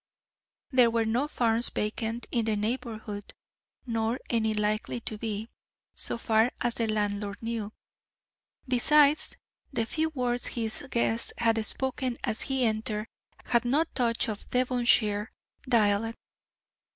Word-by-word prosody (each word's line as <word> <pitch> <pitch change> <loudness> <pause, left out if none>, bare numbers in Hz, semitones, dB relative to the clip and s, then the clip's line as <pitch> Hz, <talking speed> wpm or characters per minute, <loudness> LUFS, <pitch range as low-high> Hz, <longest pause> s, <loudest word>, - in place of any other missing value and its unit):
There 250 -3 +6
were 230 -1 +1
no 240 +6 +1
farms 235 -4 +1
vacant 225 +2 -2
in 235 -2 +1
the 220 -1 +1
neighbourhood, 215 -2 -4 0.5
nor 230 +1 -1
any 220 -2 +1
likely 210 +3 0
to 220 - -4
be, 220 -1 -3 0.5
so - - +2
far 225 +1 +3
as 240 -1 0
the 230 -1 -1
landlord 205 -1 -1
knew; 225 -2 -3 1.0
besides, 285 +4 +4 0.3
the 230 -5 0
few 315 +6 0
words 245 -4 -1
his 225 0 -2
guest 235 -1 +1
had 225 -1 +2
spoken 260 +1 -2
as 220 -2 -1
he 265 -2 +1
entered 215 0 -1 0.4
had 235 0 +2
no 275 +6 +3
touch 235 -2 +1
of 210 -2 -5
the 250 - +3
Devonshire 235 -4 +2 0.4
dialect. 225 -1 +2
230 Hz, 130 wpm, -28 LUFS, 215-245 Hz, 1.0 s, There